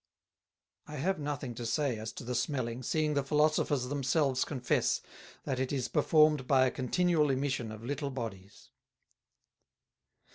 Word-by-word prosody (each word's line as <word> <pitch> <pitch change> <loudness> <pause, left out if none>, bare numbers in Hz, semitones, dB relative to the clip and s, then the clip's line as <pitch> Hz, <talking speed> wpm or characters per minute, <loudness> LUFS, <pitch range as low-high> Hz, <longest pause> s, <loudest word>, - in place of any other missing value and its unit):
"I 150 - -7
have 180 +6 -1
nothing 145 -4 -4
to 120 - -7
say, 120 0 0
as 110 +1 -5
to - - -8
the 125 +1 -4
Smelling, 125 -1 -2
seeing 155 +4 0
the 140 - +2
Philosophers 150 -1 +2
themselves 135 -1 +1
confess, 130 -5 0 0.4
that 130 - -2
it 130 0 -1
is 130 -4 -1
performed 155 -3 +3
by 130 -2 +5
a 130 - +1
continual 155 +3 +1
Emission 130 -4 -1
of 110 +1 -9
little 140 +2 -2
Bodies. 110 -7 -8
135 Hz, 145 wpm, -31 LUFS, 125-150 Hz, 0.4 s, by